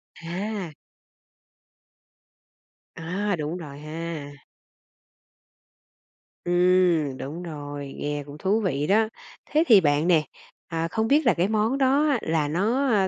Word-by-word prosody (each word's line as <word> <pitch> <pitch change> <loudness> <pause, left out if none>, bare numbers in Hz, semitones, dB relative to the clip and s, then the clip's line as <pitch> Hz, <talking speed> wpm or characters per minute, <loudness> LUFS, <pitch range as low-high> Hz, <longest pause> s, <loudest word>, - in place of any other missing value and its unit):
À. 185 +1 -4 2.2
À, 195 +5 -2
đúng 155 +2 -4
rồi 145 -4 -9
ha. 155 -1 -6 2.1
Ừm, 175 -5 +3
đúng 160 +6 -6
rồi, 145 -3 -7
nghe 145 0 -3
cũng 145 +1 -10
thú 200 +6 +1
vị 150 -6 -1
đó. 220 +2 +3 0.4
Thế 310 +2 +2
thì 210 -5 +8
bạn 145 +2 +2
nè, 160 -4 +4 0.4
à, 165 0 -2
không 220 +5 -1
biết 295 +3 +3
là 235 - +5
cái 175 +2 +1
món 220 +5 +1
đó 275 +3 +3
á 270 - +2
là 160 -2 0
nó, 220 - +1
a, 200 -4 +3
175 Hz, 130 wpm, -25 LUFS, 150-210 Hz, 2.2 s, thì